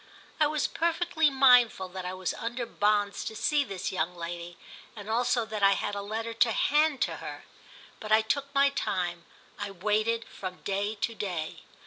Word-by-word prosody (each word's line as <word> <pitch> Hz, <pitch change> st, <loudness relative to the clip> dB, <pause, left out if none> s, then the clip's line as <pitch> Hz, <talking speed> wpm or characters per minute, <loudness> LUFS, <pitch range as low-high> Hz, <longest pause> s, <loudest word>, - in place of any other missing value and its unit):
I 305 Hz, -, +5 dB
was 305 Hz, 0 st, 0 dB
perfectly 335 Hz, -1 st, +1 dB
mindful 250 Hz, -7 st, +5 dB
that 185 Hz, 0 st, -6 dB
I 180 Hz, +1 st, -4 dB
was 185 Hz, -1 st, -2 dB
under 240 Hz, +1 st, -4 dB
bonds 205 Hz, -2 st, +1 dB
to 220 Hz, -, -5 dB
see 290 Hz, +6 st, +2 dB
this 195 Hz, -8 st, -4 dB
young 180 Hz, 0 st, -2 dB
lady, 170 Hz, 0 st, -6 dB, 0.4 s
and 205 Hz, -2 st, -9 dB
also 235 Hz, 0 st, +2 dB
that 215 Hz, -1 st, -5 dB
I 200 Hz, 0 st, +6 dB
had 205 Hz, -, -2 dB
a 200 Hz, -, -3 dB
letter 225 Hz, +3 st, -4 dB
to 230 Hz, 0 st, +3 dB
hand 295 Hz, +4 st, +2 dB
to -, -, -2 dB
her; -, -, -8 dB, 0.5 s
but 215 Hz, -, -7 dB
I 220 Hz, +1 st, +6 dB
took 280 Hz, +5 st, -1 dB
my 280 Hz, 0 st, +5 dB
time, 175 Hz, -8 st, -2 dB, 0.3 s
I -, -, -3 dB
waited 215 Hz, +4 st, 0 dB
from 185 Hz, -1 st, -8 dB
day 200 Hz, +2 st, -1 dB
to 230 Hz, +2 st, -2 dB
day. 180 Hz, -7 st, -4 dB
215 Hz, 180 wpm, -28 LUFS, 190-250 Hz, 0.5 s, I